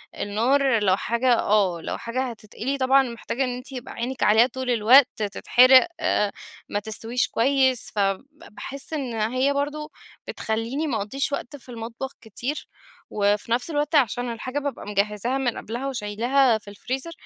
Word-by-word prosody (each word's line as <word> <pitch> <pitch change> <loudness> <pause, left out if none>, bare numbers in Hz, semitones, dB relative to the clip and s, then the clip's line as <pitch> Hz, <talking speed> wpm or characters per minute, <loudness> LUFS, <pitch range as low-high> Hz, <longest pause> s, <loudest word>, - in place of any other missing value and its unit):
النار 235 +2 +1
لو 190 -1 +3
حاجة 240 +2 +1
آه، 195 -5 +2
لو - - -4
حاجة 235 +3 -3
هتتقلي، 230 +4 -5
طبعًا 270 +1 +4
محتاجة 240 +2 -3
إن 250 -1 -2
أنتِ 250 +2 -9
يبقى 250 -2 -7
عينيِك 245 +2 -3
عليها 220 +4 +5
طول 260 0 -5
الوقت، 240 +4 +6
تتحرق 255 - +5
آآ 210 -1 +1 0.4
ما 205 - -1
تستويش 225 +3 -1
كويّس، 260 0 +2
فب 195 +3 0
باحس 280 0 -9
إن 265 -6 -3
هي 255 +5 +1
برضو 295 +2 -3 0.4
بتخليني 230 +8 -2
ما 235 -6 -1
أقضيش 270 +8 -2
وقت 280 0 -4
في 255 - -18
المطبخ 235 +3 -6
كتير 245 +7 -5 0.4
وفي 205 +2 0
نفس 245 +7 0
الوقت 295 +1 -1
عشان 245 -2 +2
الحاجة 255 +5 -4
بابقى 285 -6 -5
مجهزها 210 +5 0
من 250 -3 -1
قبلها 240 +5 -5
وشيلاها 240 +1 +1
في 210 -1 -11
الفريزر، 260 +9 -5
245 Hz, 155 wpm, -24 LUFS, 220-270 Hz, 0.4 s, الوقت